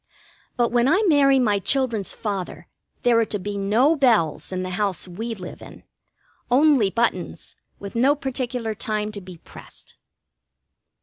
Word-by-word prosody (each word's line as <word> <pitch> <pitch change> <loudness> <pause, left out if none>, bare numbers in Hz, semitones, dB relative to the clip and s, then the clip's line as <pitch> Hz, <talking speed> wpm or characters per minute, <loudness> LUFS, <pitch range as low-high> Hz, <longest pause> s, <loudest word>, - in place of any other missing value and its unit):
But 240 -2 +1
when 240 +1 +2
I 380 +9 +3
marry 280 -5 +4
my 210 -6 +2
children's 230 -3 0
father 200 -4 -5 0.4
there 240 -1 +4
are 230 - +2
to 210 - -3
be 205 +1 -5
no 220 +10 +2
bells 225 - +1
in 185 0 -3
the 185 - -5
house 195 -2 -2
we 225 +6 -5
live 180 -3 -9
in. - - -13 0.7
Only 265 -4 +4
buttons, 235 +4 -2 0.2
with 200 0 -9
no 265 +5 +3
particular 250 -5 -3
time 215 0 -3
to 205 -1 -8
be 180 -2 -11
pressed. - - -14
225 Hz, 150 wpm, -23 LUFS, 200-260 Hz, 0.7 s, marry